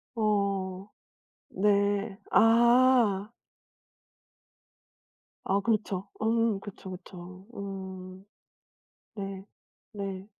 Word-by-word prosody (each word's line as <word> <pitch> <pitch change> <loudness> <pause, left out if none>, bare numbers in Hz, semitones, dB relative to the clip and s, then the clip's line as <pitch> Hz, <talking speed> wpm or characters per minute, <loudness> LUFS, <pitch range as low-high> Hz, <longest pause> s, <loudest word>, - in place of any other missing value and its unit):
어 200 -3 0 0.6
네 200 +1 +1
아. 235 -2 +5 2.1
아 195 +1 +1
그렇죠. 200 -2 -1
음 225 -2 +2
그쵸 195 -2 -9
그쵸. 185 +1 -11
음 190 -1 -7 0.9
네 195 -2 -6 0.5
네. 195 -2 -5
200 Hz, 85 characters per minute, -29 LUFS, 190-215 Hz, 2.1 s, 아